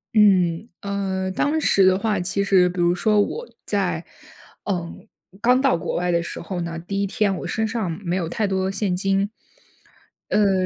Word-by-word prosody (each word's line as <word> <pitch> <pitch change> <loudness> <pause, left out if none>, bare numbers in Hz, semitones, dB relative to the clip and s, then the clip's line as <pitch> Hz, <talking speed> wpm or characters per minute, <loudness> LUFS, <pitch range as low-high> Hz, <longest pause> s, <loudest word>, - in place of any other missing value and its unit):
嗯。 190 -1 +4
呃， 190 -2 -2
当 295 +11 +1
时 195 -10 +4
的 185 0 +5
话， 210 -1 0
其 195 +3 0
实 185 -2 +4
比 180 0 -6
如 175 0 +3
说 210 +4 +2
我 475 - -3 0.2
在， - - -1 0.6
嗯， 175 -4 -4 0.3
刚 250 +2 +4
到 270 -1 +3
国 165 - -4
外 180 0 0
的 170 0 +2
时 170 - -6
候 175 +1 -4
呢， 170 -1 -4
第 195 +4 -3
一 200 - 0
天 200 -1 0
我 - - -5
身 220 0 -1
上 215 -5 -2
没 175 +1 0
有 180 -3 -1
太 215 +5 -1
多 190 -1 0
现 195 -2 -1
金。 195 +2 +1 1.0
呃， 195 -3 +3
195 Hz, 195 characters per minute, -22 LUFS, 180-210 Hz, 1.0 s, 的